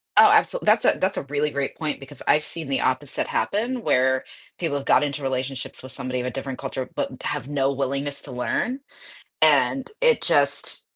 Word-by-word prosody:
Oh, - - +9
absol - - +3
that's - - +4
a - - +4
that's 190 +1 0
a - - -2
really 145 +1 0
great 140 -1 -2
point, 155 -2 -2
because 140 0 -12
I've 150 - +4
seen 160 -2 -7
the 135 - +1
opposite 130 +2 -1
happen, 240 +5 -1
where 130 -3 +2 0.4
people 160 -5 0
have 140 - -6
got - - +5
into 145 0 -2
relationships 130 -1 -4
with 130 - -9
somebody 130 -1 -3
of - - -4
a 125 - -2
different 135 -1 -5
culture, 130 -1 -4
but - - -3
have 125 - -2
no 140 -1 +1
willingness 140 +1 -2
to 140 - -9
learn, 185 - -1 0.6
and 270 -1 +4
it 485 -1 +4
just - - +1
140 Hz, 195 wpm, -24 LUFS, 130-150 Hz, 0.6 s, Oh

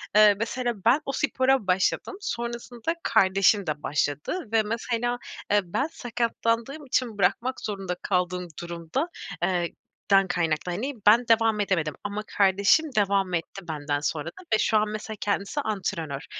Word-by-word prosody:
eee, 210 -1 +7
mesela 240 +1 -1
ben 260 +7 +5
o - - -2
spora 265 -5 +1
başladım. 190 - +1
Sonrasında 235 - -3
kardeşim 195 0 +3
de 150 -1 -3
başladı 150 - -1
ve 225 -1 +3
mesela, 235 +2 -1 0.3
eee, 205 - +5
ben 225 - -1
sakatlandığım 235 +3 -2
için 245 -4 -1
bırakmak 255 +5 +1
zorunda 195 -4 -3
kaldığım 180 -1 -1
durumda, 170 - -3 0.3
eee, 175 -2 0 0.4
dan 195 -1 +6
kaynaklı 170 -1 -1
hani, 255 +11 -3
ben 235 +4 +7
devam 225 -2 +3
edemedim 170 -7 0
ama 205 +1 -3
kardeşim 200 +10 +4
devam 195 -2 +2
etti 175 +2 -4
benden 145 -2 -2
sonra 150 +2 -2 0.2
ve 220 - +6
şu 220 - +3
an 210 0 +1
mesela 215 0 -5
kendisi 205 +7 -1
antrenör. 180 - -3
205 Hz, 145 wpm, -26 LUFS, 180-235 Hz, 0.4 s, eee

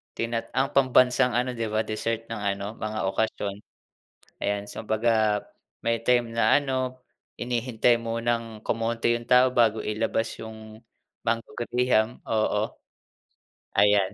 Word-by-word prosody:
tina 115 0 -2
ang 135 +1 +2
pambansang 125 -2 +4
ano 125 +1 +1
'di 115 -1 -1
ba, 110 - +2
dessert 115 +1 -3
ng 115 - -4
ano, 100 +2 -2
mga 110 -2 -2
okasyon. 100 -1 -2 0.9
Ayan, 100 0 0
so - - -6
'baga 110 -1 +2 0.4
may 115 0 +1
time 120 -2 +3
na 110 +2 +5
ano, 130 -2 -2 0.4
hinihintay 120 -1 +1
munang 115 -1 -2
kumonti 115 +1 0
'yung 120 - -11
tao 125 +1 +6
bago 115 -2 +3
ilabas 110 +1 -1
yung 110 0 -10 0.5
mango 115 0 -1
graham, 120 -1 +1
oo. 110 -1 +1 1.1
Ayan. 105 -2 +4
115 Hz, 125 wpm, -26 LUFS, 110-120 Hz, 1.1 s, tao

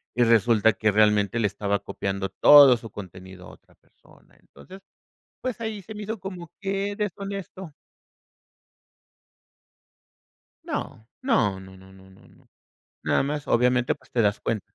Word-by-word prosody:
y 120 - +3
resulta 115 -1 +3
que, 105 +2 0
realmente, 105 0 +2
le 105 - +2
estaba 100 0 -2
copiando 95 0 -4
todo 140 -1 +7
su 115 -1 -11
contenido 95 -1 -11
a - - -12
otra - - -21
persona. - - -25
Entonces, 190 +1 -15 0.6
pues, 255 -2 -4
ahí 220 -2 -4
se 215 +4 -10
me 210 - -7
hizo 220 +1 -5
como 185 -3 -8
que 195 +1 -2
deshonesto. 195 -4 -6 2.9
No, 110 - -6 0.2
no 105 - +1
no 95 0 -13
no 95 0 -17
no 95 0 -18
no 95 - -20
no. - - -24 0.6
Nada - - +1
más, 145 +1 -4
obviamente, 125 +1 +2
pues, 135 - -25
te 120 - +1
das 105 -1 +1
cuenta. 110 -3 -2
115 Hz, 145 wpm, -24 LUFS, -, 2.9 s, todo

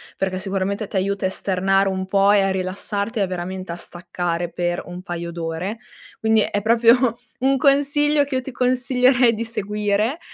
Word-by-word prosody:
perché 190 -1 -2
sicuramente 195 +2 -2
t'aiuta 195 0 -2
a - - +2
esternare 195 +1 +1
un 190 0 -3
po' 195 +1 +3
e 205 - +5
a 195 - +1
rilassarti 200 +4 -3
e - - +3
veramente 185 0 -5
a - - -4
staccare 175 -1 -3
per 175 0 -2
un 180 0 -8
paio 170 -1 -5
d'ore. 170 +6 -4 0.4
Quindi 220 0 +3
è 205 0 -1
proprio 230 +2 +4 0.2
un 270 +1 +2
consiglio 285 +2 +3
che 280 -2 -4
io 260 - +1
ti 270 - -8
consiglierei 250 -1 +3
di 225 +2 -3
seguire, 210 - -1
200 Hz, 170 wpm, -21 LUFS, 185-240 Hz, 0.4 s, e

